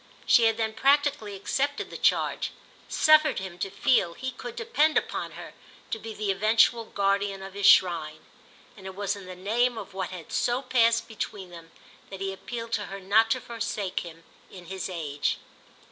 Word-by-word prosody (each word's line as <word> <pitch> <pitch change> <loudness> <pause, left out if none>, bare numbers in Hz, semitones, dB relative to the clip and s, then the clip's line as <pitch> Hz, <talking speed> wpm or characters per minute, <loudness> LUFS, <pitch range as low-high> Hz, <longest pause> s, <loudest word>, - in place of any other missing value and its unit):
She 235 - +5
had 225 -1 +3
then 220 -1 -1
practically 275 -4 +2
accepted 280 +9 -2
the - - -8
charge, - - +1 0.4
suffered 310 -2 +5
him 190 -2 -6
to 195 - -2
feel 190 -3 +2
he 260 0 -4
could 450 - -8
depend 320 -10 +2
upon - - -2
her - - -10 0.4
to 225 - -2
be 225 +1 -7
the 210 -1 -1
eventual 225 +3 +3
guardian 200 -1 0
of 195 0 -9
his 200 0 +2
shrine; 160 -4 +4 0.5
and 190 -2 -11
it 190 - -8
was 200 0 -1
in 195 -2 -11
the 185 - -8
name 230 +6 0
of 205 -3 -8
what 190 -1 -3
had 180 -4 -9
so 245 +2 0
passed 230 -3 +3
between 205 -4 -6
them 165 -1 -12 0.4
that 195 - -8
he 195 0 -3
appealed 230 +3 -7
to 210 -3 -1
her 195 +1 -7
not 210 +4 +3
to 255 - +1
forsake 225 -5 -3
him 165 -1 -10 0.3
in 180 -2 -12
his 190 +2 -5
age. 150 -5 -2
205 Hz, 185 wpm, -27 LUFS, 190-235 Hz, 0.5 s, She